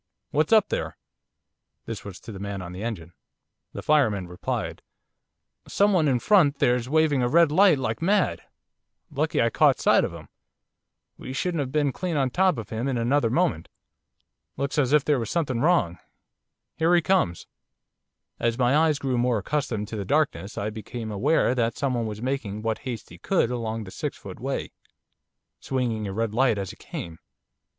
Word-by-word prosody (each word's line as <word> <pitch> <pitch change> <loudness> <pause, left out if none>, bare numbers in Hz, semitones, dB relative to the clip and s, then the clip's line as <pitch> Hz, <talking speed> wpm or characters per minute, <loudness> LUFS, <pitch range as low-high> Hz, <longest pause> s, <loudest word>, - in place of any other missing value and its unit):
What's 155 +1 +1
up 220 -3 +5
there?' - - -3 0.9
This - - -6
was 100 -3 -9
to - - -9
the 100 - -8
man 100 -1 -5
on 90 - -8
the 90 +2 -7
engine. 90 -8 -5 0.6
The - - -6
fireman 110 -12 +2
replied: 90 0 -4 0.9
'Someone 195 -6 +3
in 130 -3 +3
front 150 - +4
there's 125 -1 +1
waving 155 -3 +3
a 120 - +2
red 165 +2 +5
light 185 -1 +5
like 115 -2 -3
mad, 185 - +1 0.7
lucky - - 0
I - - +3
caught - - +4
sight - - +4
of - - -2
him, - - -11 0.9
we 130 - -7
should 175 +7 -1
have 140 -6 -2
been 145 -1 +1
clean 175 +3 -3
on 135 -2 +1
top 185 +3 +2
of 115 - -6
him 115 +4 -2
in 130 -3 -1
another 120 +1 +2
moment. 150 - 0 0.9
Looks 140 +2 -1
as 135 -3 +2
if 150 -2 +4
there 145 -3 +2
was 115 -2 -4
something 140 -8 -1
wrong. 150 - +2 0.8
Here 165 +2 +3
he 175 - +4
comes.' 170 - +1 0.9
As 115 0 0
my 125 +1 +3
eyes 155 -1 +3
grew 130 -3 -1
more 120 -1 +2
accustomed 110 -2 -2
to 110 - -5
the 100 - -3
darkness 140 -4 0
I 105 +2 -2
became 110 +1 -6
aware 125 +6 +2
that 115 -2 0
someone 125 -5 -1
was 105 +1 -6
making 115 -6 -3
what 110 -1 -1
haste 115 -3 -6
he - - -12
could 175 -11 +1
along 115 -2 -3
the 95 - -10
six - - -4
foot - - -10
way, - - -3 0.9
swinging 120 -5 -2
a - - -4
red 110 +2 -2
light 120 -2 +3
as 100 -2 -4
he - - -13
came. 80 -1 -8
125 Hz, 180 wpm, -25 LUFS, 110-150 Hz, 0.9 s, up